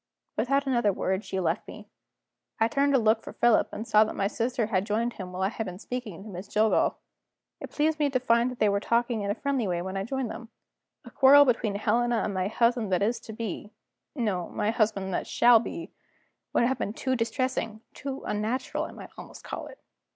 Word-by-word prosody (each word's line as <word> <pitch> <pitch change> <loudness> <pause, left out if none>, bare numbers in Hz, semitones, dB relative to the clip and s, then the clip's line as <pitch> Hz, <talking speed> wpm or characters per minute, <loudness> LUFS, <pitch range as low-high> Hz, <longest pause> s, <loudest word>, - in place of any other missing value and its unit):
Without 275 +6 +1
another 240 -6 +2
word, 190 +1 -1
she 190 - -3
left 170 -1 -1
me. - - -10 0.7
I 225 - +4
turned 280 +4 +1
to - - +6
look 220 0 +3
for - - -9
Philip, 240 -2 +3
and 220 - -6
saw 215 0 +6
that 220 - -4
my 195 - 0
sister 230 +3 -1
had 195 -4 0
joined 225 +3 -1
him 185 -2 -7
while 185 +1 -3
I 190 - +2
had 225 0 -4
been 180 0 -6
speaking 220 -4 -6
to 215 - -10
Miss 185 0 -7
Jillgall. 215 +1 +2 0.6
It - - -7
pleased 310 +1 0
me 295 -1 +2
to 260 -2 +1
find 235 0 +2
that 250 - -7
they 215 - +3
were 200 0 +2
talking 235 +1 0
in 200 - -2
a 205 - 0
friendly 275 -6 -1
way 175 -2 -1
when 190 +1 -5
I 195 - -1
joined 260 +1 -3
them. 230 -1 -9 0.6
A - - -11
quarrel 285 +1 +7
between 225 -5 +1
Helena 235 +3 +1
and 205 - -2
my 185 0 0
husband 235 -1 +1
that 185 +1 +2
is 230 +4 0
to 220 - -10
be 215 -1 -5 0.4
no, 205 - -1
my 210 - -1
husband 205 -4 0
that - - -2
shall 240 -1 +6
be 335 +8 -6 0.6
would - - +2
have 255 +1 +1
been 205 - -2
too 260 +2 -1
distressing, 230 -2 -2
too 275 -1 -6
unnatural 225 +5 -2
I - - -9
might - - -11
almost - - -11
call - - -6
it. - - -12
225 Hz, 220 wpm, -27 LUFS, 205-245 Hz, 0.7 s, quarrel